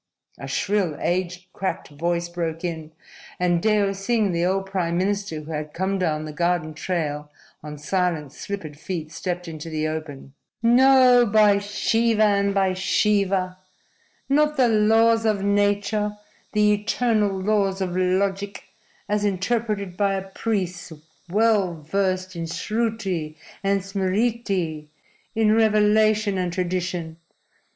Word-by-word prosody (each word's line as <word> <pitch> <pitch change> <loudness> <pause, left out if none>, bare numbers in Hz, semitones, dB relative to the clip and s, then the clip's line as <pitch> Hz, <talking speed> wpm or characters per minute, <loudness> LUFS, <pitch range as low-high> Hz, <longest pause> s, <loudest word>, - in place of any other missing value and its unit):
a - - -7
shrill, 195 -7 0
age 180 +1 -2
cracked 190 - -3
voice 170 +3 -2
broke 170 -1 -4
in, 160 -3 -4 0.5
and 175 -1 +2
Deo 205 -2 +2
Singh, 200 +1 0
the 170 0 0
old 190 +2 0
prime 180 -3 -1
minister 195 -4 -1
who 155 +2 -9
had 150 -1 -5
come 190 +2 -1
down 155 -4 -1
the 155 - -7
garden 170 -1 0
trail 150 -3 -3 0.3
on 150 0 -8
silent, 155 -2 -1
slippered 155 -5 -7
feet, 165 -3 -5
stepped 180 +1 -4
into 160 0 -7
the 155 -1 -1
open. 155 -3 -6 0.3
"No! 250 +1 +6
By 205 -1 +5
Shiva 220 +2 +1
and 200 -1 +3
by 195 -1 +1
Shiva! 190 -1 +1 0.7
Not 300 +2 +2
the 255 -2 +5
laws 225 +1 +4
of 210 -3 +1
nature, 205 +1 +1 0.4
the 210 0 +4
eternal 210 -2 0
laws 195 -1 +1
of 180 -2 -2
logic, 195 +2 0 0.4
as 210 0 0
interpreted 200 -1 -1
by 200 -1 +1
a 195 0 -5
priest 190 -5 -3 0.4
well 205 -3 +2
versed 185 +3 -1
in 165 -1 -4
Sruti 195 -7 -2 0.3
and 195 0 +1
Smriti 195 -4 -1 0.5
in 220 -1 +3
revelation 215 -2 +3
and 180 -1 -1
tradition. 180 -2 -3
195 Hz, 130 wpm, -23 LUFS, 170-210 Hz, 0.7 s, No